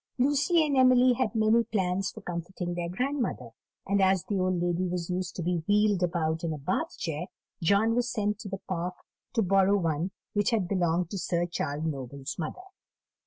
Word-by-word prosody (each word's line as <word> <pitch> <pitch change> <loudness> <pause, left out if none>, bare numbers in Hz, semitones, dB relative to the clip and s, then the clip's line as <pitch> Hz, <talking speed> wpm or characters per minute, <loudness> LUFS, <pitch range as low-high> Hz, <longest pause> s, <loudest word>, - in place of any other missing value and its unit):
Lucy 290 +5 +3
and 290 -2 0
Emily 255 -1 +6
had 240 -4 -1
many 220 +1 +4
plans 190 -3 -1
for 220 - -10
comforting 175 0 -4
their 175 -1 -3
grandmother; 255 +7 -2 0.3
and 200 0 +2
as 190 -1 +3
the 200 -2 -1
old 185 -1 +1
lady 175 +1 0
was 180 0 -3
used 180 -1 -3
to 175 - -3
be 175 -1 0
wheeled 205 -2 +3
about 165 -2 0
in 165 - -1
a 155 - -3
Bath 185 - -2
chair, 165 +1 -3 0.3
John 200 +6 +3
was 245 0 0
sent 210 -3 -1
to 220 -3 -7
the 195 0 -5
Park 180 0 -2 0.4
to 225 - +2
borrow 195 +1 +4
one 165 -1 0 0.2
which 205 -1 +2
had 215 -6 +1
belonged 175 -2 0
to 200 - -3
Sir 175 0 0
Charles 155 -3 -3
Noble's 140 -2 -4
mother. 170 - -4
185 Hz, 190 wpm, -28 LUFS, 170-215 Hz, 0.4 s, Emily